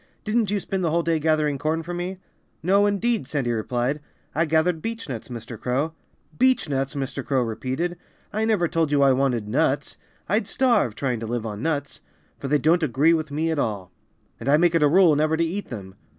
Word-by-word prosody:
"Didn't 215 -1 +1
you 205 0 0
spend 190 0 -3
the 165 - +2
whole 170 +2 +1
day 165 -1 +1
gathering 155 -2 +1
corn 160 +3 -1
for 175 +2 -5
me?" 180 +2 -4 0.5
"No, 200 +4 +4
indeed!" 205 - 0
Sandy 135 -5 -1
replied. 120 +5 -1 0.3
"I 165 +2 +2
gathered 160 +1 +1
beechnuts, 225 - -5
Mr. 115 -2 -8
Crow." 135 +6 -1 0.4
"Beechnuts!" 145 - +1
Mr. 135 0 -3
Crow 130 -2 +1
repeated. 130 +10 -3 0.4
"I 215 +2 0
never 210 -6 +2
told 165 -2 0
you 145 -1 +4
I 135 - +6
wanted 125 -5 0
nuts. 135 +5 0 0.3
I'd 205 +1 +1
starve, 235 - +2
trying 125 -3 -1
to 115 - -5
live 120 0 -2
on 105 -1 -5
nuts; 145 -2 -2 0.4
for 140 - -4
they 150 +2 +3
don't 165 +4 +3
agree 150 +3 +3
with 155 -2 -1
me 155 +3 -1
at 160 - -1
all. 100 -7 -2 0.5
And - - -3
I 145 - +6
make 170 +1 +3
it 165 - +3
a 150 - +6
rule 170 0 +5
never 155 +2 +2
to 165 - +2
eat 195 +5 -4
them. 95 -5 -7
155 Hz, 205 wpm, -24 LUFS, 130-175 Hz, 0.5 s, I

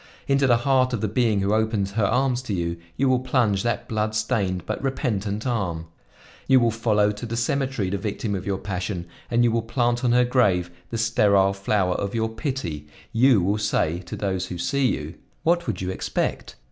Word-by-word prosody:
Into 140 0 +3
the 120 -2 +5
heart 130 -2 +3
of 115 - -1
the 110 - +1
being 110 -1 +1
who 100 +2 +1
opens 110 -3 0
her 105 0 +1
arms 125 +3 +1
to 110 -6 -3
you, 85 -1 -2 0.2
you 135 - +2
will 130 -1 +3
plunge 125 -6 +1
that 120 +1 -2
blood 110 -1 -1
stained 100 -6 -1
but - - -3
repentant 110 -6 -2
arm; 95 -10 -2 0.6
you 130 -1 +6
will 120 -1 +2
follow 105 -2 +2
to 105 +3 -9
the 115 +1 -3
cemetery 125 -4 -1
the 100 - -1
victim 105 +1 -3
of 95 -2 -3
your 100 -1 0
passion, 90 -2 -4 0.2
and 120 0 +3
you 120 - +3
will 115 0 +1
plant 120 +2 0
on 120 - +3
her 125 +1 +4
grave 100 -9 +2 0.2
the 115 - -3
sterile 100 -4 +3
flower 100 -1 0
of 100 +4 -3
your 110 -1 0
pity; 110 - -4 0.3
you 120 -4 +5
will 100 +3 +1
say 90 -5 0
to 90 - -7
those 95 -2 -2
who 90 - -6
see 140 +9 +1
you: 75 -7 -3 0.3
'What 170 +1 +2
would - - -2
you 95 0 -2
expect? - - -3
110 Hz, 205 wpm, -24 LUFS, 95-125 Hz, 0.6 s, you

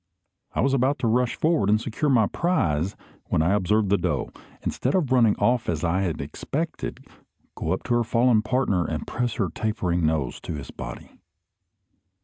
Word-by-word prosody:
I - - +2
was 135 0 +2
about 135 +2 +2
to 115 - -1
rush 125 +2 +2
forward 155 -11 +2
and 105 +1 +4
secure 120 +6 -1
my 120 -5 +5
prize, 95 - 0 0.3
when 80 - +1
I 85 +4 +2
observed 105 +1 +2
the 100 - +4
doe, 80 -7 -1 0.3
instead 130 - -1
of 155 -9 +1
running 115 -5 +5
off 120 -1 +1
as 80 -1 -1
I 90 +3 +1
had 85 -7 -2
expected, 150 - -4 0.5
go - - -3
up - - -1
to - - -1
her 120 0 +3
fallen 115 -1 +3
partner 110 -6 +1
and - - -3
press 120 -1 -2
her 95 -5 0
tapering 90 -6 -1
nose 80 -5 0
to - - -5
his 70 - -7
body. - - -8
110 Hz, 180 wpm, -25 LUFS, 90-125 Hz, 0.5 s, my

